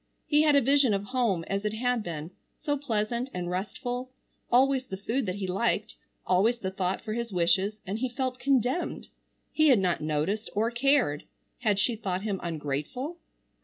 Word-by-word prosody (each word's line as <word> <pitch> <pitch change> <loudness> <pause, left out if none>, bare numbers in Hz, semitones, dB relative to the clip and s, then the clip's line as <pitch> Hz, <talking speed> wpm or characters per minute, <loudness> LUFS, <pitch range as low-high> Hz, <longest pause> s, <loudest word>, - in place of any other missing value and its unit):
He 295 0 +4
had 300 -2 +5
a 280 - +6
vision 270 -4 +4
of 195 - -2
home 215 -6 0
as 195 +1 -2
it 210 0 -1
had 245 +1 0
been, 165 -3 -5 0.3
so 290 - -1
pleasant 235 -2 -1
and 175 -1 -3
restful, 245 +7 -3 0.4
always 265 +1 +4
the 190 - -5
food 225 +4 -1
that 185 - -1
he 200 -1 -3
liked, 195 +6 0 0.3
always 205 +7 +3
the 190 -5 -3
thought 190 0 -1
for 215 - -3
his 235 0 -3
wishes, 190 +4 +1
and 195 +4 -3
he 255 +1 -1
felt 255 0 -3
condemned. 260 +4 0 0.4
He 310 0 +4
had 260 -5 +7
not 180 -4 +1
noticed 155 +8 -1
or 225 +3 +1
cared. 245 - +2 0.3
Had 210 -4 +2
she 230 +4 +1
thought 190 -3 -3
him 200 -3 -2
ungrateful? 165 - -3
215 Hz, 180 wpm, -28 LUFS, 190-255 Hz, 0.4 s, had